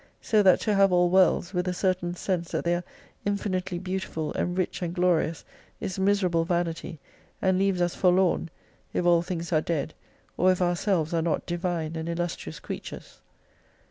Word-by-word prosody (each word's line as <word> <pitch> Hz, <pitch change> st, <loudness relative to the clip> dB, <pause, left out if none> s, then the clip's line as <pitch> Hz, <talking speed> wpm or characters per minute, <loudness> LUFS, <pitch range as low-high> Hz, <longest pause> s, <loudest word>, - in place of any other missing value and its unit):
So 215 Hz, -2 st, +3 dB
that 190 Hz, -3 st, +5 dB
to 215 Hz, -, +1 dB
have 195 Hz, -1 st, +4 dB
all 175 Hz, 0 st, +3 dB
worlds.with 180 Hz, 0 st, +3 dB
a 180 Hz, -, -1 dB
certain 180 Hz, -2 st, 0 dB
sense 175 Hz, -2 st, -2 dB
that -, -, -2 dB
they 170 Hz, -, +2 dB
are 175 Hz, 0 st, -1 dB, 0.4 s
infinitely 190 Hz, -3 st, -2 dB
beautiful 185 Hz, -4 st, -3 dB
and 175 Hz, +1 st, -2 dB
rich 185 Hz, 0 st, -1 dB
and 175 Hz, 0 st, -3 dB
glorious 175 Hz, -3 st, +1 dB, 0.3 s
is 190 Hz, 0 st, -4 dB
miserable 190 Hz, -4 st, +2 dB
vanity, 165 Hz, -1 st, -2 dB, 0.4 s
and 190 Hz, 0 st, +2 dB
leaves 195 Hz, -2 st, +1 dB
us 175 Hz, -, 0 dB
forlorn, 180 Hz, -2 st, +2 dB, 0.4 s
if 180 Hz, -, 0 dB
all 170 Hz, -1 st, +5 dB
things 170 Hz, -1 st, -4 dB
are 155 Hz, -, +4 dB
dead, 155 Hz, -2 st, -2 dB, 0.4 s
or 185 Hz, +2 st, +5 dB
if 185 Hz, -, 0 dB
ourselves 175 Hz, -2 st, +1 dB
are 165 Hz, -, +2 dB
not 165 Hz, 0 st, -1 dB
Divine 170 Hz, -2 st, -2 dB
and 160 Hz, +1 st, -4 dB
illustrious 170 Hz, -, -4 dB
creatures. -, -, -8 dB
175 Hz, 170 wpm, -27 LUFS, 170-185 Hz, 0.4 s, that